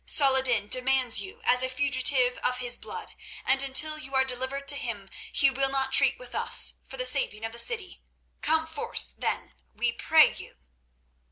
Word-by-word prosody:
Saladin 265 -6 +3
demands 255 0 +1
you 420 +5 -10
as 250 0 +4
a 260 - -2
fugitive 260 -1 +1
of 250 - -1
his 245 -1 -1
blood, - - -9 0.3
and 265 +1 +4
until 305 +3 +1
you 270 -2 -8
are 265 0 +3
delivered 260 +2 -4
to 285 - +5
him 210 -7 -6 0.2
he 275 -1 +4
will 270 +1 +1
not 270 0 -2
treat - - +4
with - - -12
us - - +3
for 265 - -9
the 255 - -2
saving 250 -4 0
of 225 - -6
the 235 - -3
city. 450 - -3 0.4
Come 320 +1 +1
forth, 320 +9 -7
then, - - -4 0.2
we 240 -1 -1
pray 315 +6 +3
you." - - -9
265 Hz, 180 wpm, -26 LUFS, 250-280 Hz, 0.4 s, to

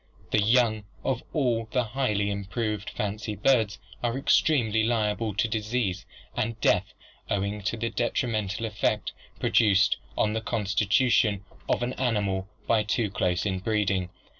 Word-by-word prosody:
The 105 - +3
young 110 -1 +3 0.2
of 130 -1 0
all 125 -7 +1
of 110 - -11
the 125 +2 +1
highly 105 -4 0
improved 105 +1 -3
fancy 105 +1 -3
birds 110 -2 +2 0.2
are 120 +1 0
extremely 120 -6 +3
liable 110 -2 0
to 110 - +2
disease 110 -3 -2 0.3
and 115 0 -2
death 95 -1 +2 0.3
owing 100 +1 -1
to 105 +4 -2
the 115 +1 -2
detrimental 115 -3 -1
effect 105 0 -1 0.3
produced 100 -4 +4 0.2
on 105 0 +2
the 110 - -1
constitution 105 -1 +2 0.2
of - - +1
an 125 +1 -1
animal 100 -6 0 0.2
by 115 -2 +3
too 105 0 0
close 90 -2 0
inbreeding. 95 -1 0
110 Hz, 140 wpm, -27 LUFS, 100-115 Hz, 0.3 s, produced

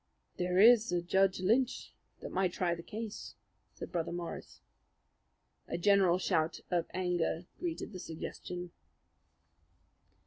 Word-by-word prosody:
"There 180 0 0
is 230 +2 +7
a 175 - +2
Judge 190 +1 +2
Lynch 245 +7 +1 0.3
that - - -6
might 185 -2 +1
try 175 -2 0
the 170 - -6
case," 215 +4 -7 0.4
said - - -7
Brother 170 -2 -2
Morris. 175 0 -6 1.1
A - - -3
general 190 -1 +4
shout 160 -3 0
of 175 -2 +1
anger 175 -2 -1
greeted 335 -10 -4
the 185 - -6
suggestion. 175 +2 -6
180 Hz, 125 wpm, -33 LUFS, 175-200 Hz, 1.1 s, is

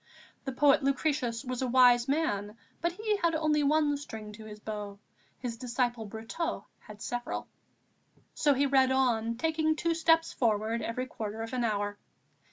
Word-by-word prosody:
The 270 - -2
poet 275 +2 +4
Lucretius 275 -3 0
was 255 0 -3
a 260 - 0
wise 245 -1 +5
man, 220 -8 -1 0.2
but 340 +1 0
he 425 +2 0
had 335 -4 +1
only 310 -1 +2
one 295 0 +3
string 220 -7 -8
to 215 +1 -11
his 210 -1 -9
bow; 210 -2 -6 0.4
his 240 -3 -5
disciple 240 -2 -1
Brotteaux 225 - -4
had 210 -1 -11
several. 245 0 -4 0.9
So 290 -2 +3
he 280 +2 +2
read 265 -1 +4
on, 230 -3 +1
taking 315 +2 +1
two 335 +1 0
steps 325 0 +3
forward 225 -1 0
every 250 +3 -2
quarter 220 -3 -5
of 225 - -7
an 250 -1 0
hour. 205 -2 -1
250 Hz, 165 wpm, -30 LUFS, 220-300 Hz, 0.9 s, wise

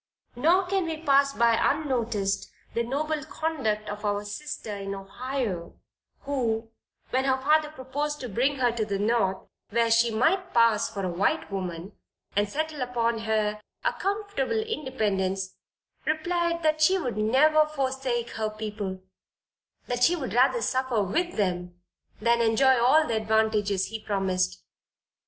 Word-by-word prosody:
Nor 340 +9 +3
can 380 0 0
we 325 -1 -3
pass 280 -3 +3
by 235 -3 +3
unnoticed 235 -9 0 0.2
the 235 - 0
noble 295 +5 -2
conduct 270 -10 -2
of 205 +1 -6
our 205 0 -1
sister 215 -1 -5
in 195 0 -5
Ohio, 195 -2 -4 0.5
who, 230 -5 -2 0.4
when 260 +1 +1
her 265 -1 +3
father 300 +3 +3
proposed 295 +1 -4
to 250 - -4
bring 250 +6 +1
her 250 -3 +2
to 230 -1 -1
the 200 -2 -2
North, 205 -2 +1 0.3
where 230 +1 +2
she 230 +1 +5
might 330 - +1
pass 230 -2 +4
for 200 -3 -4
a - - -1
white 200 - 0
woman, 185 -1 -4 0.4
and 205 0 +2
settle 310 +3 -3
upon 235 -2 0
her 215 -1 0 0.2
a - - +1
comfortable 405 -2 -1
independence, 200 - -2 0.5
replied 335 +2 0
that 310 0 +2
she 370 +5 +5
would 260 -10 -3
never 300 +8 +4
forsake 265 -4 -2
her 220 -1 -2
people 210 -3 -5 0.8
that 245 0 -1
she 345 +7 +5
would 285 -6 -4
rather 250 -1 +3
suffer 255 -3 +1
with 345 - -1
them 180 -3 -2 0.4
than 235 +2 +3
enjoy 260 +4 +4
all 305 +6 +5
the 230 - -1
advantages 215 -3 +1
he 220 +1 -5
promised. 190 -3 -1
235 Hz, 145 wpm, -27 LUFS, 210-295 Hz, 0.8 s, she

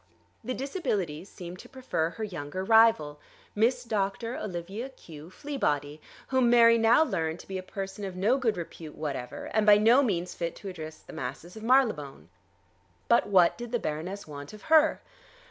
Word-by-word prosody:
The 255 - -3
Disabilities 200 - -3
seemed 180 -1 -9
to - - -12
prefer 255 -11 -2
her 220 +5 -7
younger 185 -3 -5
rival, 220 -9 +4 0.3
Miss 245 +4 +2
Doctor 220 +2 -2
Olivia 195 +6 -5
Q. 165 - -13
Fleabody, 150 - -2 0.3
whom 260 -2 +3
Mary 230 -1 +6
now 230 +6 +5
learned 160 - -2
to - - -18
be 190 -1 -4
a - - -5
person 195 +1 -6
of 190 -2 -5
no 215 +9 +2
good 230 -7 0
repute 165 -2 -8
whatever, 140 -5 -5
and 220 - +3
by 210 -1 +7
no 230 +6 +5
means 180 -9 -1
fit 170 -1 -4
to 200 - -8
address 155 -3 -8
the - - -14
masses 170 +3 -6
of 220 - -9
Marylebone. 215 - +1 0.8
But 235 - +4
what 185 -2 +4
did 240 -1 -6
the 240 - +1
Baroness 180 +2 -5
want 145 +1 -9
of 215 - -12
her? 315 0 +5
195 Hz, 175 wpm, -28 LUFS, 165-235 Hz, 0.8 s, by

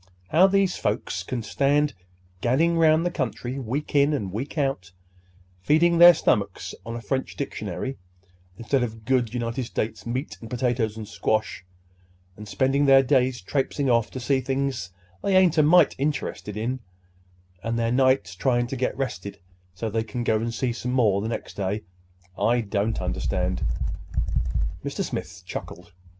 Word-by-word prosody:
How 175 +5 +6
these 195 -1 +2
folks 105 -3 -2
can 115 +5 -4
stand 145 +3 +1 0.5
gadding 160 +8 +2
'round 160 0 +4
the 175 - +1
country 130 -2 -3
week 135 +4 -4
in 145 +1 +4
and 100 -10 -2
week 130 +9 -5
out, 135 -11 -1 0.7
feeding 165 - +3
their 175 0 +10
stomachs 100 -2 0
on 115 0 -6
a 120 - -5
French 130 +5 -2
dictionary 130 0 -4 0.6
instead 125 +3 0
of 110 -2 -4
good 125 -3 +1
United 120 +1 -2
States 110 0 -4
meat 130 +5 -4
and 115 - -9
potatoes 120 -3 -1
and 110 -2 -6
squash, 110 -1 -1 0.7
and 105 +1 -10
spending 135 +6 +1
their 135 0 +7
days 130 -3 +2
traipsing 135 +5 0
off 115 -2 +2
to 130 - -6
see 130 +1 +1
things 135 -7 -2 0.3
they 195 -1 +3
ain't 175 -4 +4
a - - +8
mite 165 +4 +5
interested 140 -7 -2
in, 125 +4 -2 0.8
and 115 +3 -2
their 115 0 0
nights 130 -7 +2
trying 120 +5 +1
to 125 - -5
get 130 +1 -1
rested 100 -7 -4 0.4
so 115 - -3
they 110 +1 0
can 120 +2 -4
go 110 -2 +2
and 115 +2 -2
see 120 +1 -1
some 125 +1 -3
more 105 -6 +3
the 110 - -3
next 115 - -5
day, 100 +2 -2 0.6
I 120 +1 +3
don't 105 +1 -1
understand." - - -1 1.2
Mr. - - -2
Smith - - -6
chuckled. 90 +1 -7
125 Hz, 160 wpm, -25 LUFS, 110-140 Hz, 1.2 s, their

